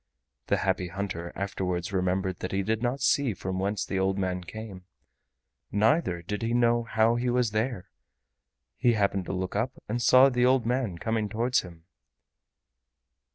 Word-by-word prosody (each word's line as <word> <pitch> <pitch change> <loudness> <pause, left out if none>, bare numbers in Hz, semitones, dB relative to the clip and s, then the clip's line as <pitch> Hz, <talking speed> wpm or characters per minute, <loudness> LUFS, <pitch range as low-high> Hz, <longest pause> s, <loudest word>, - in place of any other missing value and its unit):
The - - +2
Happy 90 - 0
Hunter 85 -2 -5
afterwards 95 -1 -3
remembered 95 0 0
that 95 - -4
he 100 0 0
did 110 +2 -1
not 125 +3 -1
see 130 -4 +2
from 95 +1 -4
whence 100 +1 -1
the 95 - -2
old 95 0 +1
man 90 -2 -2
came, 100 -1 -9 0.9
neither 105 - +2
did 105 +4 -4
he 115 +1 0
know 120 -1 +3
how 115 0 +2
he 125 +1 0
was 120 -2 +1
there—he 115 +1 -4
happened 100 -3 0
to - - -4
look 95 0 -3
up 120 +5 0
and 120 +3 -2
saw 130 +3 +7
the 125 -2 +1
old 130 -1 +3
man 120 -7 -1
coming 110 +2 -1
towards 120 +4 +1
him. 85 -3 -13
105 Hz, 160 wpm, -27 LUFS, 95-120 Hz, 0.9 s, saw